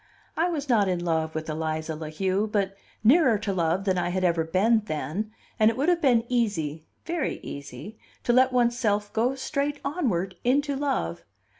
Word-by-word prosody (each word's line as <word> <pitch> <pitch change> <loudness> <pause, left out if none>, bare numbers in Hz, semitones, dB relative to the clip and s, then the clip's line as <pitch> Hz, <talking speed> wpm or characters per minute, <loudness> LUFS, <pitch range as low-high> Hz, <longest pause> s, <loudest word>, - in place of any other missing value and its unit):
I 340 +2 +1
was 295 -4 -3
not 220 -6 +3
in 175 -2 -1
love 160 -1 0
with 155 0 -3
Eliza 160 0 -3
La 155 0 -6
Heu, 190 +6 0
but 200 -2 -1 0.3
nearer 255 -1 +5
to 200 -1 -2
love 175 +1 0
than 190 -2 +1
I 175 - 0
had 185 +1 -1
ever 170 -2 +2
been 195 +8 +3
then, 190 +5 -3 0.3
and 215 0 +6
it 225 - -3
would 285 +6 +2
have 345 -1 +2
been 245 -6 +4
easy, 165 -11 -1 0.2
very 335 -1 -1
easy, 145 +9 -8 0.2
to 240 - +2
let 260 +1 +5
one's 240 -1 +2
self 205 -3 0
go 245 +4 +1
straight 280 +2 -2
onward 195 - -1
into 280 +3 +2
love. 85 - -2
210 Hz, 185 wpm, -26 LUFS, 170-255 Hz, 0.3 s, and